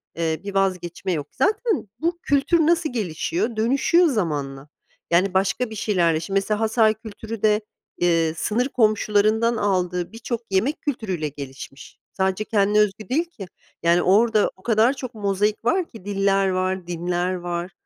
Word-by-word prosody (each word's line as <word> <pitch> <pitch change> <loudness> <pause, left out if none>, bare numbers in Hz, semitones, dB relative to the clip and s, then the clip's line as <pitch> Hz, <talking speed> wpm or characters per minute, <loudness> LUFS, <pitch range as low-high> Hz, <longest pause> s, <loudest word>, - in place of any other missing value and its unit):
eee, 160 -1 -1
bir 200 -1 -6
vazgeçme 185 -1 -1
yok 150 -4 -2
zaten 430 - 0
bu 340 +2 -1
kültür 285 +4 +2
nasıl 320 -3 +2
gelişiyor 230 - -2
dönüşüyor 275 +10 +3
zamanla 145 - -2 0.4
yani 180 +2 +3
başka 195 +5 +1
bir 220 - -8
şeylerle 175 -7 +1
şimdi 195 +4 -2
mesela 210 +2 0
Hatay 220 -1 +3
kültürü 220 0 -8
de, 215 0 +3 0.4
eee, 165 -2 +2
sınır 245 +9 0
komşularından 215 0 +2
aldığı 180 -3 -1
birçok 230 +1 -4
yemek 230 +11 0
kültürüyle 195 - -2
gelişmiş 135 -1 -10
sadece 190 +2 0
kendine 210 0 +2
özgü 210 +2 0
değil 320 +7 +1
ki 205 - -10 0.4
yani 170 +1 +4
orada 215 +3 +3
o 185 - -23
kadar 230 +3 +3
çok 255 -2 -7
mozaik 205 +2 -1
var 350 +6 +1
ki 220 -5 -13
diller 195 -1 +1
var 185 -1 -1
dinler 175 +1 -1
var 175 +1 -4
205 Hz, 150 wpm, -23 LUFS, 180-230 Hz, 0.4 s, yani